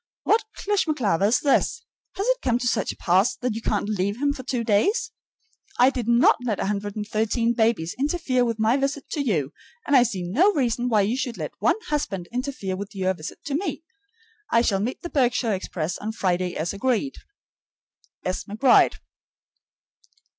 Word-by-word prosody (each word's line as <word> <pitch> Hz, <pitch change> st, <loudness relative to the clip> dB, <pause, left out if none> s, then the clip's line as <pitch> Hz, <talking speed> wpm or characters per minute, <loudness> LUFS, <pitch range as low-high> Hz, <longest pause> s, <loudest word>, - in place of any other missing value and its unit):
What 450 Hz, +1 st, +3 dB
clishmaclaver 295 Hz, -, +1 dB
is 225 Hz, -, +2 dB
this! 300 Hz, +10 st, +1 dB, 0.3 s
Has 395 Hz, -, -2 dB
it -, -, +1 dB
come 240 Hz, -2 st, +1 dB
to 245 Hz, 0 st, -2 dB
such 235 Hz, -, 0 dB
a -, -, -12 dB
pass 195 Hz, +8 st, +2 dB
that 250 Hz, -2 st, -2 dB
you 225 Hz, -, -5 dB
can't 210 Hz, -2 st, -1 dB
leave 200 Hz, +1 st, -1 dB
him 285 Hz, 0 st, +1 dB
for 265 Hz, -, -7 dB
two 250 Hz, -2 st, -2 dB
days? 400 Hz, -, +1 dB, 0.7 s
I 255 Hz, +2 st, +5 dB
did 245 Hz, -4 st, -4 dB
not 235 Hz, +1 st, +5 dB
let 220 Hz, -5 st, -1 dB
113 210 Hz, +3 st, -1 dB
babies 220 Hz, -8 st, +1 dB
interfere 275 Hz, -4 st, +1 dB
with 230 Hz, -2 st, -1 dB
my 220 Hz, +4 st, +2 dB
visit 275 Hz, +1 st, -2 dB
to 300 Hz, -, -1 dB
you, 165 Hz, -, -1 dB, 0.3 s
and 285 Hz, -, +2 dB
I 255 Hz, -, +8 dB
see 215 Hz, -7 st, -1 dB
no 280 Hz, -, +3 dB
reason 245 Hz, -3 st, 0 dB
why 215 Hz, -3 st, +4 dB
you 210 Hz, +5 st, 0 dB
should 255 Hz, -3 st, -3 dB
let -, -, -5 dB
one -, -, +2 dB
husband 200 Hz, -12 st, -2 dB
interfere 250 Hz, -7 st, -3 dB
with 200 Hz, +2 st, -7 dB
your 190 Hz, -1 st, 0 dB
visit 155 Hz, -4 st, -9 dB
to 285 Hz, -, -3 dB
me. 330 Hz, +1 st, -2 dB, 0.7 s
I 230 Hz, -, +3 dB
shall 195 Hz, -5 st, +1 dB
meet 230 Hz, +6 st, -3 dB
the 345 Hz, -, -4 dB
Berkshire 245 Hz, -5 st, +1 dB
express 180 Hz, -2 st, -3 dB
on 220 Hz, +1 st, -4 dB
Friday 180 Hz, -3 st, -1 dB
as 165 Hz, +4 st, -2 dB
agreed. 260 Hz, +5 st, -1 dB, 1.1 s
S. 185 Hz, 0 st, -2 dB
McBRIDE. 230 Hz, +5 st, +4 dB
230 Hz, 175 wpm, -24 LUFS, 200-270 Hz, 1.1 s, I